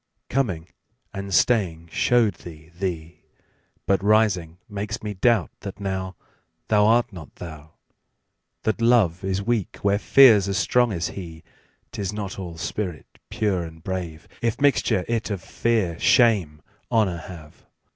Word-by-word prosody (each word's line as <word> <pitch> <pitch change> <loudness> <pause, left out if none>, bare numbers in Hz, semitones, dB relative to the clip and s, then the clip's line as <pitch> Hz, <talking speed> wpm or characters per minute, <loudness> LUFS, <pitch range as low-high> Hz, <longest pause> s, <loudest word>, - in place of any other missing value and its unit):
Coming 95 -12 -1 0.5
and 100 -1 -6
staying 85 -4 +1
show'd 115 +3 +3
thee 80 -2 -12
thee; 85 -2 -5 0.6
But 100 0 +1
rising 100 -6 +2
makes 105 0 -5
me 105 -1 -3
doubt 105 -1 +2
that 100 -3 -7
nowThou 95 -2 -4 0.6
art 110 +2 +4
not 80 -7 -11
thou. 80 -2 -10 0.9
That 110 +1 -1
Love 110 -8 +3
is 95 +1 -1
weak 115 -3 -1
where 100 0 +2
Fear's 110 -6 +6
as 100 -1 -1
strong 120 +6 +2
as 85 -3 -2
he;'Tis 90 +2 -9
not 100 -2 -5
all 85 -3 -7
spirit 90 0 -4 0.2
pure 100 -5 0
and 80 -1 -10
brave, 85 -3 -5
If 115 -2 -1
mixture 140 -9 +2
it 115 -1 -1
of 100 -3 -2
Fear, 105 -8 -1
Shame, 100 - +3 0.3
Honour 105 -7 +2
have. 80 -2 -12
95 Hz, 135 wpm, -24 LUFS, 85-110 Hz, 0.9 s, Fear's